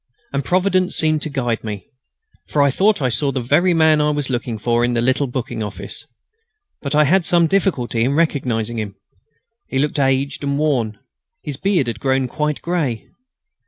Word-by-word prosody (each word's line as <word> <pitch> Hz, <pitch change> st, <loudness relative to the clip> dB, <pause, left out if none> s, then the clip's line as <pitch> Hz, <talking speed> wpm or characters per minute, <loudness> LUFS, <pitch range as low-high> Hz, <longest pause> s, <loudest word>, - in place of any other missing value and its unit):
And 140 Hz, 0 st, -1 dB
Providence 185 Hz, +2 st, +1 dB
seemed 155 Hz, -1 st, +2 dB
to 155 Hz, -, -3 dB
guide 120 Hz, -5 st, -2 dB
me, 105 Hz, -2 st, -6 dB, 0.6 s
for 145 Hz, -, +2 dB
I 140 Hz, -, +3 dB
thought 195 Hz, +1 st, +2 dB
I 130 Hz, -, +2 dB
saw 140 Hz, +4 st, +1 dB
the 135 Hz, -, -2 dB
very 150 Hz, +9 st, +2 dB
man 160 Hz, -2 st, +4 dB
I 150 Hz, -, +2 dB
was 145 Hz, -3 st, -2 dB
looking 120 Hz, -2 st, -2 dB
for 120 Hz, +2 st, +1 dB
in 120 Hz, 0 st, +1 dB
the 120 Hz, -, +1 dB
little 130 Hz, +3 st, +1 dB
booking 120 Hz, -3 st, -4 dB
office. 105 Hz, -2 st, -7 dB, 0.7 s
But 140 Hz, 0 st, -2 dB
I 150 Hz, -, +6 dB
had 180 Hz, +6 st, +3 dB
some 170 Hz, +1 st, +3 dB
difficulty 160 Hz, -11 st, 0 dB
in 130 Hz, +3 st, +1 dB
recognising 120 Hz, -8 st, 0 dB
him. 100 Hz, -2 st, -5 dB, 0.7 s
He 135 Hz, -, -3 dB
looked 145 Hz, +2 st, 0 dB
aged 135 Hz, +1 st, 0 dB
and 140 Hz, 0 st, 0 dB
worn. 125 Hz, -9 st, 0 dB, 0.5 s
His 145 Hz, -3 st, -5 dB
beard 190 Hz, -4 st, +1 dB
had 115 Hz, -2 st, -4 dB
grown 135 Hz, 0 st, +1 dB
quite 150 Hz, +3 st, -2 dB
grey. 155 Hz, -10 st, -2 dB
140 Hz, 185 wpm, -19 LUFS, 120-155 Hz, 0.7 s, I